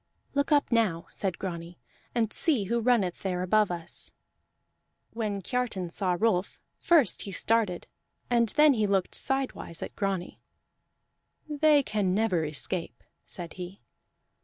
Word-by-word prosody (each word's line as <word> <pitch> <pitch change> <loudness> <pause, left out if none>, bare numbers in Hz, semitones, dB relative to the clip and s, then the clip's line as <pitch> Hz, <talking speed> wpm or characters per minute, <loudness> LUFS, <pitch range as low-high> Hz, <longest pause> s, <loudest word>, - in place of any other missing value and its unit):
"Look 285 +1 0
up 290 -3 +3
now," 205 -8 +1
said 190 -3 -3
Grani, 170 -2 -6 0.4
"and 225 -3 +1
see 290 - +2
who 235 +5 0
runneth 225 -7 +1
there 180 -2 -2
above 210 +2 +3
us." 175 -1 -2 1.0
When 210 -4 -3
Kiartan 215 -7 -2
saw 180 -2 0
Rolf, 195 -4 +1 0.2
first 310 - +3
he 200 - -5
started 210 -1 +1 0.4
and 235 -2 +2
then 300 +4 +5
he 215 -4 +1
looked 195 -2 0
sidewise 270 -10 -2
at - - -8
Grani. 195 -3 -3 1.1
"They 300 -1 +4
can 200 -6 0
never 205 -6 +1
escape," 160 +4 -2 0.2
said 170 -3 -6
he. 180 +2 -8
200 Hz, 135 wpm, -28 LUFS, 180-235 Hz, 1.1 s, then